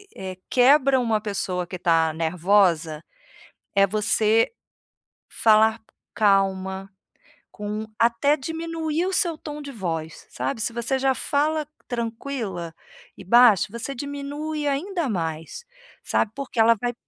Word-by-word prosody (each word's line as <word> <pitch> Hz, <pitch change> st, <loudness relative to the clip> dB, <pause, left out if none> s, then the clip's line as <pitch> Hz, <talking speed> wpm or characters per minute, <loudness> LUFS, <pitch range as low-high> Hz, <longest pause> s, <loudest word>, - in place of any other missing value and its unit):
eh, 185 Hz, -1 st, -7 dB
quebra 265 Hz, +1 st, +5 dB
uma 225 Hz, -3 st, 0 dB
pessoa 185 Hz, -4 st, -3 dB
que 185 Hz, -, -7 dB
está 165 Hz, -2 st, +2 dB
nervosa, 165 Hz, -1 st, +1 dB, 0.7 s
é 195 Hz, 0 st, +5 dB
você 215 Hz, +2 st, +2 dB, 0.8 s
falar 220 Hz, 0 st, +4 dB, 0.3 s
calma, 195 Hz, -2 st, +1 dB, 0.6 s
com 210 Hz, +1 st, -4 dB
até 240 Hz, +6 st, +3 dB
diminuir 325 Hz, +2 st, -3 dB
o 380 Hz, -, -2 dB
seu 340 Hz, -3 st, +1 dB
tom 300 Hz, -1 st, -7 dB
de 285 Hz, -, -8 dB
voz, 165 Hz, -7 st, -5 dB
sabe? 130 Hz, -, -3 dB
Se 235 Hz, -, -1 dB
você 240 Hz, +3 st, -1 dB
já 265 Hz, 0 st, +2 dB
fala 300 Hz, +4 st, 0 dB, 0.2 s
tranquila 225 Hz, -7 st, -4 dB, 0.4 s
e -, -, -9 dB
baixo, 235 Hz, -1 st, +6 dB
você 235 Hz, +4 st, -5 dB
diminui 285 Hz, +3 st, -4 dB
ainda 325 Hz, +2 st, -1 dB
mais, 165 Hz, -, -4 dB, 0.4 s
sabe. 215 Hz, -, 0 dB
Porque 275 Hz, -4 st, -7 dB
ela 230 Hz, +1 st, +6 dB
vai 245 Hz, -1 st, -2 dB
225 Hz, 125 wpm, -24 LUFS, 190-280 Hz, 0.8 s, baixo